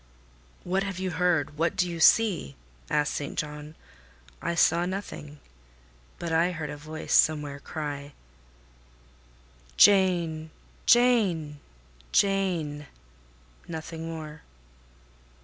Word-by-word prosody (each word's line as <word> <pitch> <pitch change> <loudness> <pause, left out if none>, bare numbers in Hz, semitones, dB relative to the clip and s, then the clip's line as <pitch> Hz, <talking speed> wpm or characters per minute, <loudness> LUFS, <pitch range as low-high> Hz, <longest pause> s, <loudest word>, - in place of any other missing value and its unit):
"What 190 +2 0
have 195 -2 -4
you 185 -1 -2
heard? 160 -3 0
What 165 +1 +1
do 180 - +1
you 170 -1 -5
see?" 175 - +4 0.3
asked 150 0 +1
St. 145 - -5
John. 150 +1 -5 0.7
I 170 - -2
saw 170 +1 +3
nothing, 150 -6 -6 0.8
but 170 - -5
I 165 +2 +2
heard 155 -3 -5
a - - -6
voice 155 +2 -6
somewhere 150 -2 +3
cry— 145 -1 -6 1.6
"Jane! 175 -5 +4 0.4
Jane! 195 -12 +3 0.5
Jane!"—nothing 150 - -3
more. 155 -1 -8
160 Hz, 95 wpm, -27 LUFS, 150-180 Hz, 1.6 s, see